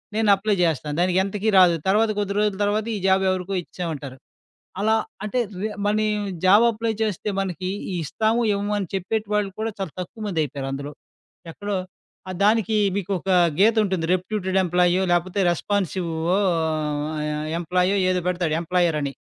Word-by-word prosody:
నేను 220 -1 +2
అప్లై 205 +1 0
జేస్తాను. 150 -3 -1
దానికెంతకీ 190 +4 +1
రాదు. 175 -2 +6
తర్వాత 215 +3 +3
కొద్ది 200 -1 -1
రోజుల 210 -1 +1
తర్వాత 210 +1 0
ఈ - - -2
జాబ్ 190 0 +3
ఎవరికో 185 +1 -2
ఇచ్చామంటారు. 150 -7 -6 0.6
అలా 220 +2 +3 0.3
అంటే, 215 +4 -2 0.2
రే 215 - -1 0.2
మనం 215 +1 +2 0.4
జాబ్ 205 +5 +6
అప్లై 225 0 -2
చేస్తే 210 -2 -2
మనకి 185 -1 -3 0.3
ఇస్తాము 220 +9 0
ఇవ్వము 205 +1 -2
అని 195 - -2
చెప్పేటివాళ్ళు 210 +1 -1
కూడా 225 0 -1
చాలా 190 -6 -4
తక్కువ 215 +5 -8
మందయిపోయారందులో. 140 -5 -3 0.6
ఎక్కడో 205 +3 -3 0.5
ఆ - - -3
దానికి 220 0 +3 0.2
మీకొక 195 -1 -3 0.3
గీత 220 +3 +5
ఉంటుంది, 185 -4 -1
రెప్యూటెడ్ 190 0 -2
ఎంప్లాయో 180 +1 +2
లేకపోతే 180 +3 0
రెస్పాన్సివ్ 185 -1 -1 0.3
ఆహ్, 155 -4 -1
ఎంప్లాయో 180 +3 +1
ఏదో 180 -1 +1
పెడతాడు 175 -3 0
ఎంప్లాయర్ 170 -2 +1
అని. 140 -1 -2
185 Hz, 140 wpm, -23 LUFS, 170-205 Hz, 0.6 s, రాదు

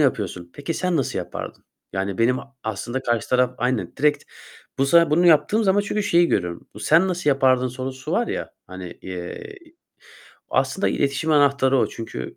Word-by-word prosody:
yapıyorsun. 95 - -1
Peki 150 +3 -4
sen 180 -2 0
nasıl 135 - -1
yapardın? - - -7 0.3
Yani 95 0 -3
benim 125 +3 +3
a 135 -1 -13
aslında 110 +4 -4
karşı 120 -3 -1
taraf 125 0 +2
Aynen 125 -1 -1
direkt 150 0 +1 0.5
bu 135 - +2
sana 170 +1 +5
bunu 170 +4 +4
yaptığım 190 +7 +4
zaman 195 +1 +3
çünkü 205 +1 -2
şeyi 175 -4 +3
görüyorum: 90 -3 -2
Bu 105 - -10
sen 165 +9 +4
nasıl 175 -5 0
yapardın 130 -2 +3
sorusu 130 +3 -6
var 235 +5 +1
ya, - - -4 0.2
hani, 95 -1 -8
eee, 90 - -7 0.9
aslında - - +1
iletişim 140 +3 0
anahtarı 140 -2 +3
o - - +3
çünkü, 110 - -7
135 Hz, 170 wpm, -22 LUFS, 115-160 Hz, 0.9 s, sana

